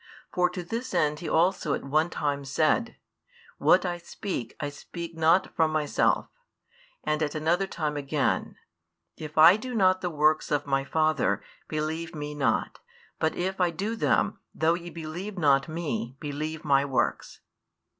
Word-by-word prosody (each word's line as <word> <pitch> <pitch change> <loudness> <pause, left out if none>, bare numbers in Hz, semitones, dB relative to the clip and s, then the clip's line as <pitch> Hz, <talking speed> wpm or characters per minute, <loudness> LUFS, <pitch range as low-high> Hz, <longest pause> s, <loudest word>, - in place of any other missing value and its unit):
For 180 0 +3
to 180 0 -5
this 230 +8 -4
end 150 0 +2
He 170 - -5
also 170 -3 +2
at - - -6
one 155 +4 +1
time 145 -3 -2
said: 155 - +1 0.6
What - - +4
I 175 -1 -2
speak, 170 - -5
I 145 -3 -2
speak 170 +4 -8
not 165 +3 +3
from 160 -1 +3
Myself; 155 -2 +1 0.8
and 155 +1 0
at 150 -1 -1
another 170 +5 +1
time 155 -5 -3
again: 145 0 -1 0.6
If 155 0 -9
I 165 +5 +9
do 250 +2 -6
not 185 -3 +3
the 180 - -1
works 155 -1 +2
of 145 -1 0
My 135 -1 +1
Father, 155 +2 +1 0.2
believe 160 +2 -3
Me 150 0 -5
not. 145 -2 0 0.4
But 160 - +1
if 190 +1 -2
I 180 - +4
do 200 +7 -3
them, - - +1 0.2
though 160 +1 +3
ye 175 0 -5
believe 170 +5 -6
not 140 -5 +3
Me, 140 -7 -3
believe 155 +1 -4
My 140 -2 +4
works. 135 -2 -1
160 Hz, 160 wpm, -27 LUFS, 150-175 Hz, 0.8 s, I